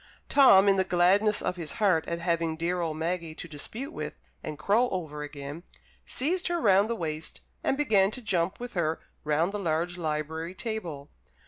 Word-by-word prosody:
Tom, 205 -9 +7
in 195 -1 +5
the 190 - +4
gladness 190 +4 +3
of 180 - -1
his 165 -3 -4
heart 195 -8 +2
at 170 - -2
having 170 -2 0
dear 175 +2 -1
old 160 -2 -2
Maggie 165 -1 -2
to 175 - -7
dispute 215 - -5
with 150 0 -5 0.3
and 155 -1 -6
crow 225 - +2
over 155 -5 -4
again, 145 +1 -7 0.4
seized 345 +8 0
her 345 -1 0
round 200 - +4
the 235 - 0
waist, 160 -4 -4 0.2
and 270 - +1
began 205 -10 +4
to 255 - -7
jump 185 -2 0
with 245 0 -6
her 165 -3 0 0.2
round 155 +4 +1
the 205 - -3
large 175 0 -1
library 160 +2 -3
table. 180 -9 -5
175 Hz, 185 wpm, -28 LUFS, 160-205 Hz, 0.4 s, Tom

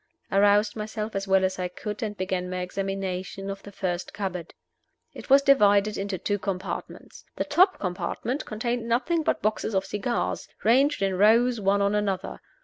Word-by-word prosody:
I 195 - +3
roused 205 +1 +4
myself 215 0 -5
as 195 0 -2
well 190 0 +4
as 185 0 -2
I 180 - -1
could, 210 +5 -6
and 210 -2 -3
began 185 -1 -2
my 185 0 -3
examination 195 0 -4
of 195 0 -7
the 205 - -11
first 180 -2 -3
cupboard. 180 -4 -5 0.6
It - - -11
was 275 +1 +7
divided 210 -6 +4
into 195 -1 -3
two 205 +3 -1
compartments. 190 -1 -5
The - - -1
top 340 +7 +4
compartment 210 +8 -3
contained 235 +1 -3
nothing 320 +8 +1
but 315 - -1
boxes 215 0 -1
of 190 0 +1
cigars, 210 +5 -2 0.2
ranged 265 +2 +3
in 190 -1 0
rows, 230 +3 +4
one 200 +1 +2
on 200 +1 +1
another. 205 -3 -2
205 Hz, 175 wpm, -26 LUFS, 190-225 Hz, 0.6 s, was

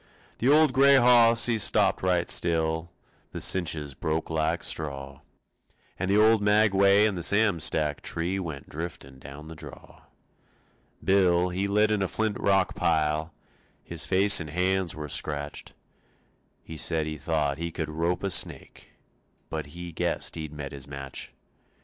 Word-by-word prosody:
The 125 - +1
old 150 -1 +5
gray 140 +1 +5
hoss 120 -2 +5
he 115 -2 +1
stopped 100 -2 +2
right 90 -2 +1
still; 80 0 0 0.4
The - - -5
cinches 80 -6 0
broke 80 +4 -3
like 80 +2 -1
straw, 70 -3 -4 0.8
And 95 +1 -2
the 100 - +3
old 110 0 +4
maguey 105 -1 +4
and 105 - -3
the 90 - -4
Sam 100 0 +2
Stack 75 -1 0
tree 90 +4 -2
Went 80 -7 -7
driftin' 75 -5 -8
down 70 +4 -11
the 80 - -9
draw. 80 - -13 1.0
Bill, 90 -2 +3
he 95 +2 -2
lit 105 +2 +2
in 105 -2 0
a 95 - 0
flint 110 0 -2
rock 95 -2 +1
pile, 80 -4 0 0.5
His 85 -1 -3
face 100 +2 +3
and 80 -3 -6
hands 90 +2 -1
were 75 -1 -6
scratched. 75 0 -3 0.9
He 80 - -9
said 80 0 -1
he 75 -1 -6
thought 75 -2 -1
he 85 0 -3
could 80 -1 -5
rope 85 +4 -2
a 100 - -1
snake - - -2 0.6
But 80 -2 -4
he 85 +3 -9
guessed - - -2
he'd 80 -2 -6
met 75 -2 -7
his 70 -2 -10
match. 70 -1 -7
85 Hz, 155 wpm, -26 LUFS, 75-100 Hz, 1.0 s, old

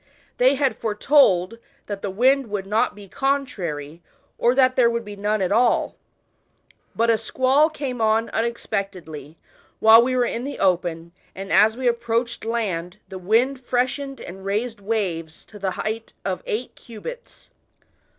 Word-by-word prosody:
They 260 +3 +5
had 275 -1 0
foretold, 220 -3 +3 0.3
that 205 -1 -6
the 200 - -3
wind 255 +6 +2
would 205 -2 -3
not 210 +3 0
be 205 -1 -12
contrary, 180 - -3 0.4
or 240 +2 +3
that 255 -1 +4
there 240 -2 +4
would 235 -1 -3
be 205 0 -8
none 205 0 -1
at 185 - -1
all; 235 +3 +2 1.0
but 230 +1 +3
a 225 - +2
squall 260 +7 +2
came 270 -6 -5
on 220 +1 +2
unexpectedly, 195 - -4 0.4
while 220 +1 +8
we 255 +2 0
were 250 -1 +2
in 235 0 -3
the 285 +2 -5
open, 170 -3 0 0.2
and 195 +1 -7
as 220 +2 +5
we 255 -1 -1
approached 235 0 -1
land 200 -6 -2
the 190 -1 -7
wind 240 +8 +1
freshened 260 +3 -1
and 190 +2 -9
raised 215 +3 -2
waves 180 -7 -3
to 210 - -13
the 195 -1 -1
height 220 +1 -4
of 185 -2 -2
eight 240 +4 -3
cubits. 480 - -11
225 Hz, 155 wpm, -23 LUFS, 195-250 Hz, 1.0 s, while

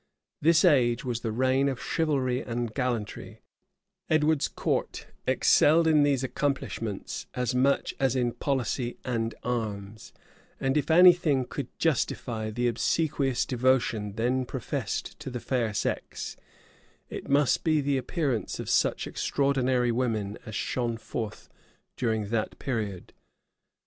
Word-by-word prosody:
This 165 +3 +5
age 125 -7 +3
was 120 -2 -2
the 115 -2 -3
reign 130 +4 +2
of 130 -2 -4
chivalry 135 -6 0
and 120 -2 -3
gallantry: 120 -6 -3 0.7
Edward's 155 -1 +3
court - - -2 0.2
excelled 165 +3 +5
in 155 -2 +5
these 140 -2 +2
accomplishments 130 -6 -3
as 125 -1 -1
much 135 +2 +2
as 135 -2 +2
in 120 -2 +1
policy 130 -3 -2
and 115 -2 -1
arms: 110 -3 -4 0.5
and 135 +1 0
if 150 - 0
any 180 +2 +9
thing 145 -7 0
could 135 0 -5
justify 120 -7 -1
the 120 +3 -1
obsequious 135 +2 0
devotion 120 -5 +1
then 125 +4 0
professed 125 -1 -4
to - - -6
the 125 -1 -4
fair 120 -3 -1
sex, 105 - -3 0.8
it - - -7
must 140 0 +3
be 155 -2 +3
the 140 -1 +1
appearance 130 - -2
of - - -3
such - - +2
extraordinary 130 -3 +1
women 110 -4 -1
as 110 - -6
shone 120 +1 -1
forth 115 -1 -6 0.5
during 110 -4 -1
that 110 -1 -2
period. 110 -8 -4
125 Hz, 130 wpm, -28 LUFS, 115-140 Hz, 0.8 s, any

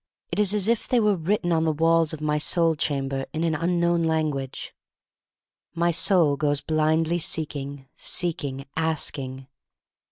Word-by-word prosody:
It - - -2
is 210 0 +3
as 205 -1 +1
if 230 -1 +1
they 250 - +2
were 210 -2 +3
written 175 +1 -1
on 160 -1 +2
the 160 - +2
walls 165 +1 +2
of 155 - -6
my 150 0 0
soul 165 +1 +2
chamber 135 -3 -2
in 160 +1 -2
an 165 -1 +1
un 170 +3 0
known 170 0 +2
language. 155 -5 -2 1.0
My 170 +1 +2
soul 165 -4 +3
goes 145 -1 0
blindly 160 +3 +1
seeking, 145 -4 -2
seek 175 -4 -1
ing, 135 -1 -5
asking. 140 -5 -2
160 Hz, 160 wpm, -25 LUFS, 145-170 Hz, 1.0 s, is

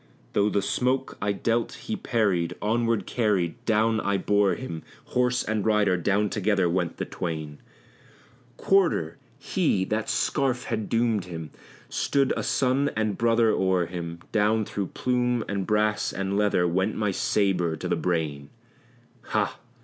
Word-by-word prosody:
Though 100 +1 +3
the 100 -1 0
stroke 130 +5 0
I 105 0 +1
dealt 115 +3 0
he 220 - -5
parried, 100 - 0
onward 115 -1 0
carried, 100 -8 0
down 110 0 +2
I 100 0 +1
bore 100 0 +2
him 85 -12 -6 0.2
Horse 125 0 +1
and 110 -2 -1
rider 105 -3 +3
down 100 +4 +1
together 100 -3 +1
went 85 -1 -1
the - - -2
twain: 80 -4 -5 1.0
"Quarter!" 170 - +2 0.2
He! 95 -1 0
that 110 +2 -2
scarf 130 -4 0
had 110 -2 -3
doomed 115 -4 +1
him! 80 -3 -7 0.4
stood 140 -2 +1
a - - -2
son 135 +2 +1
and 110 -2 0
brother 115 0 +3
o'er 95 -2 +2
him; 85 -1 -6
Down 110 0 +2
through 100 -2 -3
plume 125 0 0
and 100 -2 -2
brass 105 0 +1
and 95 0 -2
leather 100 -4 +2
went 95 +5 0
my 105 -2 0
sabre 90 -4 +1
to - - -5
the - - +1
brain 75 -5 -2 0.8
Ha! - - -1
105 Hz, 150 wpm, -26 LUFS, 90-115 Hz, 1.0 s, Though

